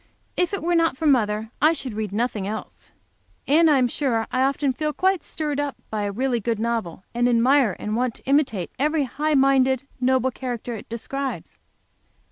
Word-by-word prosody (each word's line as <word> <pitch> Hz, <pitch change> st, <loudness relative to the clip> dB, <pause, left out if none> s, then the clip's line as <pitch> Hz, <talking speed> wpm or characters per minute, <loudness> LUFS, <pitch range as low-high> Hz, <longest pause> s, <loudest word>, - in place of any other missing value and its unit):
If 360 Hz, -, +1 dB
it 400 Hz, -, -3 dB
were 345 Hz, +1 st, +1 dB
not 330 Hz, -5 st, +2 dB
for 320 Hz, -, -3 dB
mother 220 Hz, -5 st, +2 dB
I 310 Hz, +2 st, +5 dB
should 265 Hz, -6 st, -4 dB
read 210 Hz, -2 st, -3 dB
nothing 210 Hz, -2 st, -1 dB
else. 220 Hz, +1 st, -7 dB, 0.6 s
And 320 Hz, +3 st, +5 dB
I 295 Hz, -, +5 dB
am 255 Hz, -2 st, +3 dB
sure 235 Hz, -3 st, 0 dB
I 255 Hz, -, +1 dB
often 275 Hz, 0 st, +1 dB
feel 305 Hz, +3 st, -2 dB
quite 375 Hz, 0 st, +1 dB
stirred 295 Hz, -2 st, -3 dB
up 290 Hz, -1 st, -2 dB, 0.2 s
by 215 Hz, -1 st, -2 dB
a 200 Hz, -, -2 dB
really 245 Hz, +3 st, 0 dB
good 230 Hz, +1 st, -1 dB
novel, 220 Hz, -6 st, -2 dB
and 240 Hz, +1 st, +2 dB
admire 245 Hz, -1 st, +3 dB
and 210 Hz, +1 st, -3 dB
want 245 Hz, -1 st, 0 dB
to -, -, -7 dB
imitate 265 Hz, -, +1 dB
every 300 Hz, +1 st, +2 dB
high 300 Hz, +4 st, -1 dB
minded, 265 Hz, -1 st, +3 dB, 0.2 s
noble 260 Hz, 0 st, +2 dB
character 245 Hz, -2 st, -5 dB
it 215 Hz, -, -9 dB
describes. 270 Hz, +4 st, -5 dB
260 Hz, 190 wpm, -23 LUFS, 230-290 Hz, 0.6 s, I